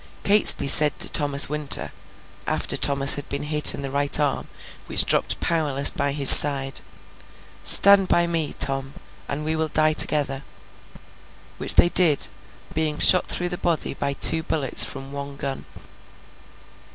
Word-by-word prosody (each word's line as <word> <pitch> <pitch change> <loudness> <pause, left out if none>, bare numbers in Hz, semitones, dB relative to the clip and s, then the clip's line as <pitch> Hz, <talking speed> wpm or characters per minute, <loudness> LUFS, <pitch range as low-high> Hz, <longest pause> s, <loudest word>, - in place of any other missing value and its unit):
Catesby 205 -7 +3
said 150 +1 +3
to - - -3
Thomas 145 -2 +2
Winter, 150 -1 -2 0.6
after - - -4
Thomas 140 0 +1
had 145 0 -8
been 140 - -8
hit 150 0 +1
in 140 - -12
the 135 - -9
right 145 +1 -3
arm 145 -2 -5 0.4
which - - +3
dropped - - -3
powerless 145 -5 -1
by 140 - -6
his 140 -1 -5
side, 135 -2 +7 0.8
'Stand 200 -1 +2
by 175 -1 -2
me, 165 -3 -5
Tom, 135 0 -5 0.3
and 150 +2 -8
we 160 +1 -5
will 160 0 -5
die 155 0 -3
together!'—which 140 -3 -6
they 175 - +1
did, 170 -5 +1 0.4
being 155 -2 -5
shot 185 - +1
through 175 0 -6
the 175 - -10
body 170 -3 -5
by 140 0 -7
two 160 +3 -1
bullets 150 -3 -2
from 135 0 -10
one 140 0 -11
gun. 135 -1 -10
145 Hz, 150 wpm, -18 LUFS, 140-160 Hz, 0.8 s, side